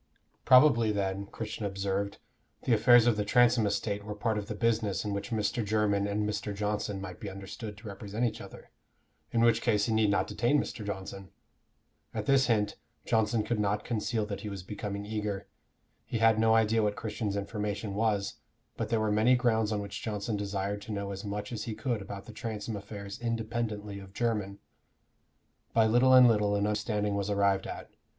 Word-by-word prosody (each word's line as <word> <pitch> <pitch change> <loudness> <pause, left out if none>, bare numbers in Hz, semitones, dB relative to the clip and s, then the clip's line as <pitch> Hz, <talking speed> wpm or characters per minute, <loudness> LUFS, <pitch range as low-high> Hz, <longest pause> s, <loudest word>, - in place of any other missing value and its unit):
Probably 125 -4 +6
then, 100 -1 -2
Christian 110 +1 -6
observed, 100 0 -2 0.5
the 125 - +2
affairs 120 +2 +6
of 120 -3 +3
the 105 - +1
Transome 120 0 +4
estate 100 0 -2
were 105 0 -6
part 110 0 0
of 100 - -7
the 105 - -4
business 110 -2 0
in 105 - -2
which 100 0 -4
Mr. 110 0 0
Jermyn 105 -1 +1
and 105 +1 -1
Mr. 105 -1 -3
Johnson 105 -1 -2
might 95 - -7
be 105 - -5
understood 100 +2 -8
to 110 - -11
represent 105 +3 -3
each 110 -2 -2
other, - - -12 0.6
in 115 - +1
which 115 -1 +4
case 105 -4 +2
he 115 - 0
need 110 -1 +3
not 100 - +2
detain 120 +7 +1
Mr. 110 - -4
Johnson? 95 -1 -6 0.9
At - - -2
this 135 -2 +4
hint 105 -3 +1 0.3
Johnson 110 0 +2
could 110 +1 -1
not 105 0 0
conceal 110 -1 -1
that 100 -2 -5
he 105 - -5
was 100 -3 -6
becoming 100 +1 -5
eager. 105 -2 -3 0.6
He - - -3
had 115 -1 +4
no 110 0 +4
idea 110 0 +3
what 105 -1 +1
Christian's 105 -2 -3
information 105 0 -3
was, 100 -2 0 0.4
but - - -2
there 115 - +2
were 110 -1 +1
many 110 +4 +4
grounds 110 -3 +2
on 105 -1 -1
which 100 0 -6
Johnson 105 0 -3
desired 100 0 -2
to 105 - -8
know 100 -1 -3
as 95 0 -6
much 105 +1 -4
as 110 -3 -4
he 110 - -4
could 110 0 -2
about 100 0 -7
the 110 - -10
Transome 110 -1 -4
affairs 100 0 -7
independently 110 -3 -3
of 95 -1 -12
Jermyn. 105 -4 -1 1.2
By 115 -1 +5
little 125 +4 +5
and 125 -1 +9
little 105 -3 +3
an 100 0 +1
understanding 105 -1 0
was 100 0 -1
arrived 100 -1 +2
at. - - -7
105 Hz, 190 wpm, -30 LUFS, 100-115 Hz, 1.2 s, and